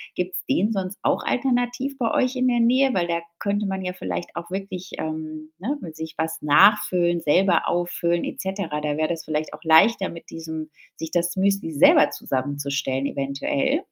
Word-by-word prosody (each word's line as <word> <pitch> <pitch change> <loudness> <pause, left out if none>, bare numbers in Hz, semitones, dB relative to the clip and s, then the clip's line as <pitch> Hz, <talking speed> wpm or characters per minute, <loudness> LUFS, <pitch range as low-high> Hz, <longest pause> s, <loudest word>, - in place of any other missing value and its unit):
Gibt's 180 0 -2
den - - +2
sonst 190 0 -4
auch - - +1
alternativ 250 +2 0
bei 235 -4 0
euch 255 +1 +1
in 255 0 +1
der 240 -1 +2
Nähe? 255 +3 +4
Weil 175 -2 +1
da 170 0 -1 0.2
könnte 205 0 -1
man 190 -1 -2
ja 180 0 -3
vielleicht 90 - -5
auch 170 +1 -6
wirklich, 190 -1 -5
ähm, 155 0 -5
ne, 270 +11 -3
mit 160 -4 -8
sich 160 0 -6
was 160 0 -2
nachfüllen, 175 +1 +4
selber 175 +3 +3
auffüllen 175 -1 0
et - - -5
cetera. 190 -6 -3
Da 150 -1 -1
wär 155 0 +1
das 165 -2 -3
vielleicht 155 0 -2
auch - - -11
leichter 185 +6 +5
mit 170 - -11
diesem 160 -1 -6 0.3
sich 160 0 -5
das 175 0 0
Müsli 195 -3 +1
selber 145 - +5
zusammenzustellen 140 0 -2
eventuell? 265 - -1
175 Hz, 180 wpm, -23 LUFS, 155-200 Hz, 0.3 s, leichter